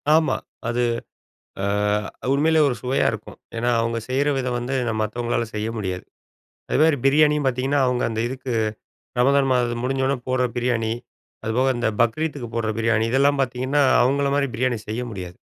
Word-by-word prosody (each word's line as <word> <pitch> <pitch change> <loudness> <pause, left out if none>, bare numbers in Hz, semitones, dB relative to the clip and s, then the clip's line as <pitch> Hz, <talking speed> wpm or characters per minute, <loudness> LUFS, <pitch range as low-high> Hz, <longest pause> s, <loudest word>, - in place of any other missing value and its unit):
ஆமா. 160 -1 +3 0.3
அது 120 +1 0 0.8
அ 105 +1 -1
உண்மையிலே 160 +3 +3
ஒரு 130 - 0
சுவையா 130 +2 +1
இருக்கும். - - -8 0.2
ஏன்னா, 120 +1 0
அவங்க 115 0 0
செய்ற 140 +3 +1
விதம் 125 -2 -1
வந்து 125 +3 -3 0.3
மத்தவங்களால 120 +2 -1
செய்ய 105 +1 -2
முடியாது. 95 -3 -4 0.7
அதுமாதிரி 155 +1 +4
பிரியாணியும் 150 +1 +4
பாத்தீங்கன்னா, 130 +3 0
அவங்க 125 -1 0
அந்த 110 0 -2
இதுக்கு 130 0 -5 0.7
ரமதான் 135 +2 +4
மாதம் 120 -1 0
முடிஞ்சோனே 135 +1 0
போட்ற 130 0 +2
பிரியாணி. 120 -2 0 0.5
அதுபோக 125 +4 +2
அந்த 120 - 0
பக்ரீத்துக்கு 125 +1 -1
போட்ற 115 -2 0
பிரியாணி. 115 -1 +2
இதெல்லாம் 140 +2 +3
பாத்தீங்கன்னா, 130 +3 +1 0.2
அவங்கள 140 +2 +2
மாதிரி 140 -1 +1
பிரியாணி 125 -1 0
செய்ய 110 +3 -3
முடியாது. 90 -4 -7
125 Hz, 145 wpm, -23 LUFS, 115-135 Hz, 0.8 s, அதுமாதிரி